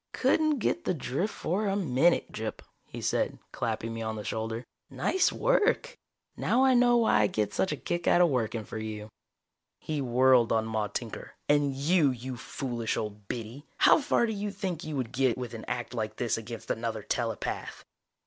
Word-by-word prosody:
"Couldn't 310 -2 +2
get 340 +8 0
the 185 - 0
drift 145 +8 -2
for 200 +5 -1
a 195 - +1
minute, 170 -2 +2
Gyp," - - -5 0.3
he - - -8
said, - - 0
clapping 115 0 -2
me 115 - -5
on 110 0 -2
the 105 - -5
shoulder. 110 +2 -3 0.3
"Nice 375 - +1
work! - - +2 0.4
Now 255 +2 +2
I 265 -1 +5
know 245 -1 +5
why 225 - +4
I 105 - +4
get 105 0 -1
such 190 - +1
a - - -2
kick 175 0 -3
out - - +5
of 175 -1 +6
working 115 -4 -1
for 110 - -6
you!" 110 -1 -6 0.7
He 155 -2 -3
whirled 125 -1 +4
on 110 -1 +2
Maude 110 -2 -2
Tinker. 115 -3 -5
"And 145 -2 +3
you, 150 +2 +3
you 130 0 -4
foolish 120 -1 -3
old 105 -2 -5
biddy! 120 +6 -6
How - - +6
far 280 -4 +2
do 220 - -2
you 205 0 -3
think 190 -4 -4
you 155 -1 -4
would 130 -4 -2
get 130 -1 +1
with 125 -2 -5
an 115 - -7
act 120 0 -3
like 110 -2 -3
this 120 -1 0
against 115 0 -6
another 115 -2 -3
telepath?" 115 -2 -3
125 Hz, 190 wpm, -29 LUFS, 110-180 Hz, 0.7 s, of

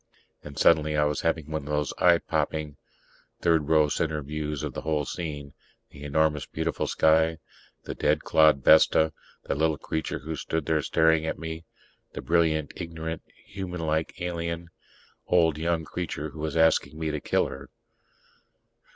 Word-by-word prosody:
And 75 -1 -10
suddenly 75 -2 +3
I 75 - +4
was 75 0 0
having 80 -2 -1
one 80 0 -2
of 70 - -10
those 75 -1 -1
eye 85 -1 +6
popping 75 -2 -2 0.6
third 80 -3 +2
row 80 -2 +5
center 75 0 -1
views 75 0 -4
of - - -4
the - - -5
whole 75 -2 -1
scene: 75 -5 -6 0.4
the 70 - -13
enormous, 75 +1 +1
beautiful 80 -2 -2
sky; 80 +1 +3 0.5
the - - -5
dead - - +1
clod, 75 -4 +4
Vesta; 80 -1 +5 0.3
the - - -2
little 80 +1 +1
creature 80 +2 -3
who 80 +4 -6
stood 80 0 -3
there 80 0 +1
staring 80 +1 +2
at - - -2
me 80 0 -6 0.5
the - - -6
brilliant 80 -3 +1
ignorant, 80 -1 -5 0.2
humanlike 85 -5 -3
alien, 85 -1 -4 0.6
old 80 -4 +3
young 85 0 -1
creature 80 -3 -5
who 80 - -11
was 80 +1 -3
asking 80 -1 +3
me 80 -1 -2
to 75 - -3
kill - - +1
her. - - -8
80 Hz, 160 wpm, -26 LUFS, 75-80 Hz, 0.6 s, eye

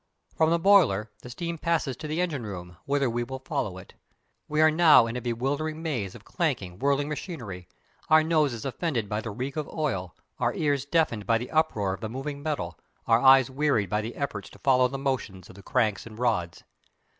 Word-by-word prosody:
From 160 0 +3
the 170 - +3
boiler 165 - +4
the 125 - -10
steam 170 +6 -5
passes 160 -6 0
to 155 - -6
the 155 +3 -1
engine 155 -8 -2
room, 90 -4 -8
whither 140 -1 +1
we 120 0 -1
will 130 +2 -6
follow 95 -7 -2
it. 95 - -12 0.5
We 150 0 -1
are 155 0 +6
now 155 -6 +7
in 115 +1 -4
a 125 - -3
bewildering 145 +7 -2
maze 120 - -3
of - - -13
clanking, 90 0 -2
whirling 140 +1 +1
machinery; 125 - -6 0.4
our 155 0 +6
noses 150 -8 +1
offended 135 - -2
by 105 +2 -2
the 115 - -5
reek 130 +7 -5
of 150 - -3
oil, 95 - -3 0.2
our - - 0
ears 145 -3 0
deafened 145 -9 0
by 115 - +4
the 120 +2 -6
uproar 110 -12 +1
of 95 - -8
the 110 - -4
moving 140 +4 -5
metal, 150 -1 -3 0.3
our 115 - +4
eyes 135 -1 +6
wearied 135 -8 +1
by 105 0 +1
the 115 +2 -6
efforts 135 -8 -4
to - - -15
follow 130 -2 +4
the 135 +2 -5
motions 130 -9 -3
of - - -13
the 100 - -12
cranks 110 -3 0
and 110 -1 -11
rods. 105 -9 -1
130 Hz, 205 wpm, -27 LUFS, 110-155 Hz, 0.5 s, now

